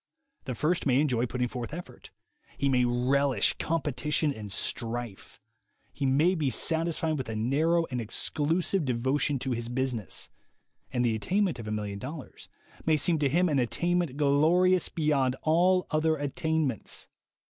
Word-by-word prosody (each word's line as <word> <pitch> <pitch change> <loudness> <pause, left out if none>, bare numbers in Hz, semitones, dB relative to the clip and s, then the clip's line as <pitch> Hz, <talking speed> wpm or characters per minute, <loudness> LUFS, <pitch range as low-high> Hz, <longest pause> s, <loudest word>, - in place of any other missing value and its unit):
The 130 -4 -3
first 155 +6 0
may 130 0 +4
enjoy 125 -5 +1
putting 125 +1 -1
forth 125 +4 -5
effort; 175 - -10 0.5
he 140 - +1
may 125 -2 +3
relish 125 0 +2
competition 150 -1 0
and 105 -4 -8
strife; 115 0 -3 0.5
he 140 - -1
may 150 +7 +3
be 155 -6 0
satisfied 160 +3 0
with 130 - -4
a 110 - -3
narrow 155 +9 +2
and 125 -1 -2
exclusive 160 - -1
devotion 130 +3 0
to 130 +1 -3
his 120 -1 -3
business; 120 -6 -3 0.6
and 125 -1 +1
the 115 - +2
attainment 175 - 0
of 110 - -7
a - - -3
million 105 -2 -3
dollars 140 +4 -8 0.3
may 155 -1 +3
seem 160 +2 +1
to 145 -2 +2
him 175 +6 +3
an 145 -4 +1
attainment 170 +3 0
glorious 160 +6 +3
beyond 140 -5 +1
all 180 +4 +3
other 155 +1 +2
attainments. 145 -3 -2
140 Hz, 150 wpm, -28 LUFS, 125-160 Hz, 0.6 s, may